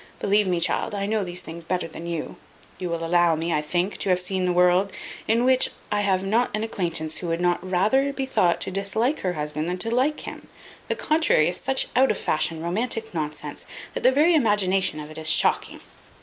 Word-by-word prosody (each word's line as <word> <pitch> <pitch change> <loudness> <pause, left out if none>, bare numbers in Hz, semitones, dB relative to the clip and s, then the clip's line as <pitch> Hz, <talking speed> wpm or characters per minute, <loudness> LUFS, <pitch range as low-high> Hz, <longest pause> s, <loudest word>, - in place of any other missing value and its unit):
Believe 205 0 +2
me, 180 -2 +1
child, 175 +4 0
I 200 0 -2
know 215 0 0
these 180 -1 -6
things 165 +1 -9
better 180 +1 -2
than 165 +1 -9
you. 170 -2 -4 0.4
You 180 - -3
will 165 0 -2
allow 170 -1 +3
me, 165 +2 -2
I 150 - +1
think, 175 +6 -1
to - - -1
have 180 -1 +3
seen 185 0 -2
the 180 - +1
world, 180 +2 +3 0.4
in 230 +2 +2
which 255 0 +3 0.2
I 205 0 +1
have 190 -2 +1
not 225 +5 +1
an 215 - -2
acquaintance 165 -7 -2
who 175 - -5
would 165 0 -1
not 175 0 +1
rather 210 +10 +2
be 270 -1 -3
thought 180 -9 +2
to - - -2
dislike 220 +8 0
her 180 -1 -1
husband 150 +1 -3
than 180 - -2
to 225 +5 -1
like 270 +5 +1
him. - - -9 0.4
The - - -1
contrary 305 - +2
is 180 - -3
such 265 0 +1
out 265 +1 +5
of - - 0
fashion 160 +1 -1
romantic 225 +5 -1
nonsense, 150 -2 -5 0.3
that - - -3
the 255 - +5
very 305 +6 +4
imagination 195 - +2
of 150 0 -8
it 155 - -8
is 160 0 -1
shocking." - - +2
185 Hz, 220 wpm, -24 LUFS, 170-220 Hz, 0.4 s, out